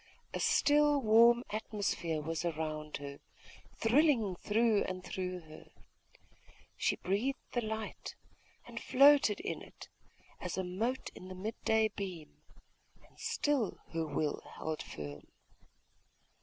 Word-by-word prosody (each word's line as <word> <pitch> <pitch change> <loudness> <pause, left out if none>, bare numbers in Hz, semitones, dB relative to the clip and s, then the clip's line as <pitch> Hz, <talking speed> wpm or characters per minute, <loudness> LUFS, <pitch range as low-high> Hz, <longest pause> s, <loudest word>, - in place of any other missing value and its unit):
A - - -2
still 295 0 +4
warm 235 +1 +6
atmosphere 200 -7 -2
was 165 +1 -2
around 155 -2 -3
her, 140 0 -8 0.6
thrilling 230 - +3
through 215 +3 +2
and 185 0 -5
through 180 -1 -4
her.... 155 -1 -13 1.1
She - - +1
breathed 215 +9 -1
the 240 - 0
light, 220 -1 -5 0.5
and - - -7
floated 275 -5 +6
in - - -4
it, - - -12 0.5
as - - -4
a 190 - 0
mote 220 +9 -2
in 185 - -11
the 185 - -7
mid 210 +5 -5
day 220 0 +4
beam.... 185 -7 -7 0.7
And - - -25
still 280 -9 0
her 165 -1 -1
will 150 0 -1 0.2
held 155 -1 -3
firm. 75 -1 -8
200 Hz, 125 wpm, -33 LUFS, 165-235 Hz, 1.1 s, warm